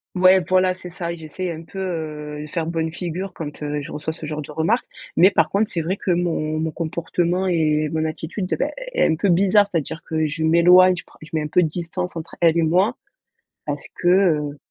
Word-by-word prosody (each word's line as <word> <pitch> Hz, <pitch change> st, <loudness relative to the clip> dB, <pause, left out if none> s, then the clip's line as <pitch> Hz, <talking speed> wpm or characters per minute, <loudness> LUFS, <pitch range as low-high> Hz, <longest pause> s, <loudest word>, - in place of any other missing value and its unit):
Ouais, 185 Hz, +1 st, +6 dB
voilà, 185 Hz, 0 st, +3 dB
c'est 180 Hz, -1 st, -10 dB
ça. 170 Hz, -1 st, -4 dB
J'essaye 170 Hz, +2 st, -5 dB
un 165 Hz, 0 st, -7 dB
peu, 170 Hz, -, -12 dB
heu, 155 Hz, -5 st, -4 dB
de 150 Hz, -, -8 dB
faire 165 Hz, +1 st, -2 dB
bonne 165 Hz, -1 st, -1 dB
figure 180 Hz, +2 st, -4 dB
quand, 150 Hz, -2 st, -7 dB
heu, 145 Hz, 0 st, -2 dB
je 140 Hz, -, -8 dB
reçois 155 Hz, +1 st, -4 dB
ce 160 Hz, -, -8 dB
genre 150 Hz, 0 st, -4 dB
de 150 Hz, -, -10 dB
remarques 165 Hz, +11 st, 0 dB, 0.3 s
mais 185 Hz, -, +7 dB
par 165 Hz, -5 st, +2 dB
contre 205 Hz, +2 st, +1 dB
c'est 170 Hz, -, -2 dB
vrai 180 Hz, +5 st, -2 dB
que 185 Hz, -, -1 dB
mon 165 Hz, -3 st, 0 dB
mon 160 Hz, 0 st, -1 dB
comportement 170 Hz, +3 st, -1 dB
et 155 Hz, -3 st, +1 dB
mon 160 Hz, 0 st, -1 dB
attitude, 160 Hz, +4 st, -4 dB
beh, -, -, 0 dB, 0.2 s
est -, -, +3 dB
un -, -, +2 dB
peu 200 Hz, -, +1 dB
bizarre. 195 Hz, +3 st, +4 dB
C'est-à-dire 165 Hz, -2 st, -3 dB
que 160 Hz, -1 st, 0 dB
je 155 Hz, +1 st, -2 dB
m'éloigne, 180 Hz, +3 st, +6 dB
je 180 Hz, -, -7 dB
prends -, -, -22 dB
je 155 Hz, -, -11 dB
mets 155 Hz, -, +1 dB
un 150 Hz, -, -3 dB
peu 180 Hz, -, +3 dB
de -, -, +2 dB
distance 175 Hz, +2 st, -4 dB
entre 165 Hz, 0 st, -7 dB
elles 170 Hz, -1 st, +4 dB
et 170 Hz, -, +3 dB
moi 185 Hz, +9 st, +2 dB, 0.7 s
parce -, -, -3 dB
que, 175 Hz, -, -2 dB
heu 160 Hz, -6 st, +3 dB
165 Hz, 230 wpm, -22 LUFS, 155-185 Hz, 0.7 s, mais